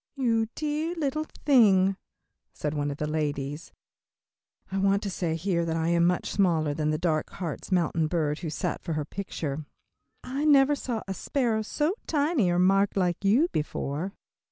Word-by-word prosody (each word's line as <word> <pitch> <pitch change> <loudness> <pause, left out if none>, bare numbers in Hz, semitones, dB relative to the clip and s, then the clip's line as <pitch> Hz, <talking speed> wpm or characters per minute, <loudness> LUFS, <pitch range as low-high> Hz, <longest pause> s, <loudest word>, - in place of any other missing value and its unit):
"You 230 -5 +1
dear 310 +3 -2
little 310 -1 -1 0.2
thing," 195 -9 +5 0.6
said 150 0 -3
one 145 -1 -1
of 140 - -5
the 150 - -2
ladies 150 -1 -3 1.0
I 195 - -1
want 195 +1 +2
to 200 - -3
say 170 -3 -1
here 170 0 0
that 165 -1 -1
I 165 0 0
am 170 0 +3
much 180 0 0
smaller 165 -6 +2
than 150 0 -1
the 155 - +1
dark 155 -2 0
Hartz 170 0 -5
Mountain 165 -3 +2
bird 155 -2 -1
who 165 - -4
sat 175 +3 -3
for 165 - -3
her 150 -1 -2
picture 155 -5 -4 0.6
"I 265 +3 -3
never 290 -2 +5
saw 245 -5 -3
a 195 - -2
sparrow 230 0 0
so 300 - 0
tiny, 290 - +2
or 175 - +1
marked 195 +3 +3
like 180 -1 0
you 230 +12 +4
before." 155 +4 -3
185 Hz, 175 wpm, -27 LUFS, 155-235 Hz, 1.0 s, thing